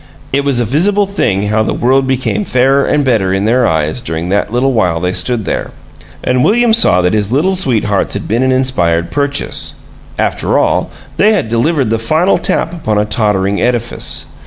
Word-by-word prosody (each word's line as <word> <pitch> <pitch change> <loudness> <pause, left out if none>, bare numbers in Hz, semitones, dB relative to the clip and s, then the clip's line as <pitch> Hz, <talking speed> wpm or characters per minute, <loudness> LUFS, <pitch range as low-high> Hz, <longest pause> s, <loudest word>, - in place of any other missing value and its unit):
It 140 +1 +1
was 140 -3 +1
a 120 - +1
visible 195 - +1
thing 105 - -1
how 110 +1 +1
the 110 - -1
world 130 +2 +1
became 130 +9 -1
fairer 135 -3 +2
and 145 -1 +1
better 110 -7 +1
in 95 +2 0
their 120 +2 +2
eyes 80 +7 -1
during 85 -5 -4
that 100 +2 0
little 130 +3 +1
while 90 -8 +1
they 90 +1 -2
stood 120 0 -1
there. - - -3 0.5
And 125 0 +1
William 235 +1 +3
saw 90 - +3
that 90 - +1
his 105 -1 0
Little 170 +9 +1
Sweethearts 110 - 0
had - - -5
been 115 +4 0
an 130 0 +2
inspired 85 -11 0
purchase, 145 0 -2 0.4
after - - 0
all; - - +1 0.3
they 215 +2 +4
had 185 - -1
delivered 125 +1 0
the 115 - 0
final 160 +12 +1
tap 165 0 -1
upon 110 -11 -2
a 105 - +1
tottering 100 -2 0
edifice. 120 -2 -1
120 Hz, 190 wpm, -13 LUFS, 105-140 Hz, 0.5 s, they